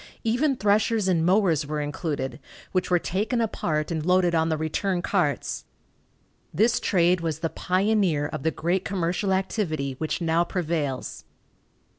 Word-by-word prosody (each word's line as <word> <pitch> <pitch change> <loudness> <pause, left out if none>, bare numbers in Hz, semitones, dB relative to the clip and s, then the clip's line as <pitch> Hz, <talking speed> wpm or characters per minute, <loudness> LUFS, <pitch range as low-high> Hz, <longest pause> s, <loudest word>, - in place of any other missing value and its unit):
Even 260 +5 +2
threshers 210 -1 +2
and 170 -4 +2
mowers 175 -5 +2
were 150 0 -2
included, 145 -2 -3 0.3
which 185 -1 0
were 180 - +4
taken 210 +8 -1
apart 160 -8 -1
and 160 -2 -2
loaded 180 0 +3
on 160 0 +2
the 160 - 0
return 175 +4 -1
carts. 175 -8 -1 0.9
This 220 +9 +2
trade 180 -2 +2
was 160 -2 -3
the 165 - 0
pioneer 185 -5 +1
of 155 -1 -4
the 160 - +1
great 175 +4 -1
commercial 185 +1 -1
activity 170 -8 -1
which 155 - -2
now 165 0 +2
prevails. 160 -7 -3
175 Hz, 145 wpm, -25 LUFS, 155-195 Hz, 0.9 s, were